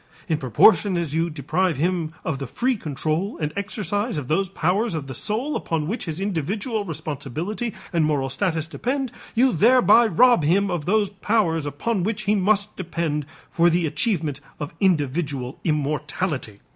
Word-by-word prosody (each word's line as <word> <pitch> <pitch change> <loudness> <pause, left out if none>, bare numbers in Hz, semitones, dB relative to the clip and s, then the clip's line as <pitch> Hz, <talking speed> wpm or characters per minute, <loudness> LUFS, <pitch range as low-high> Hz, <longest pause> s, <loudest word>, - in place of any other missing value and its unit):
In 155 -2 0
proportion 180 - +4
as 165 -4 -2
you 165 +2 +1
deprive 160 +3 0
him 170 0 0
of 145 -4 -2
the 135 - -4
free 250 - 0
control 160 +2 -2
and 150 -1 -2
exercise 205 0 -2
of 140 -4 -4
those 190 +4 +1
powers 195 +4 0
of 155 -3 -3
the 135 - -7
soul 230 - -2
upon 155 -2 -2
which 220 +5 -3
his 165 -1 -4
individual 205 - -2
responsibility 160 - -4 0.2
and 165 -2 +3
moral 145 -3 +1
status 160 +2 -1
depend, 255 - -2 0.2
you 250 +1 +4
thereby 235 +3 +6
rob 235 0 +5
him 190 +6 +2
of 170 -4 -2
those 205 0 +2
powers 190 -7 0
upon 185 +9 -1
which 215 +4 -2
he 210 0 +2
must 205 +1 +1
depend 160 -4 -2 0.2
for 170 0 +4
the 170 0 +1
achievement 155 - -1 0.2
of 145 -1 -5
individual 145 -7 0
immortality." 150 - -2
175 Hz, 160 wpm, -23 LUFS, 150-205 Hz, 0.2 s, thereby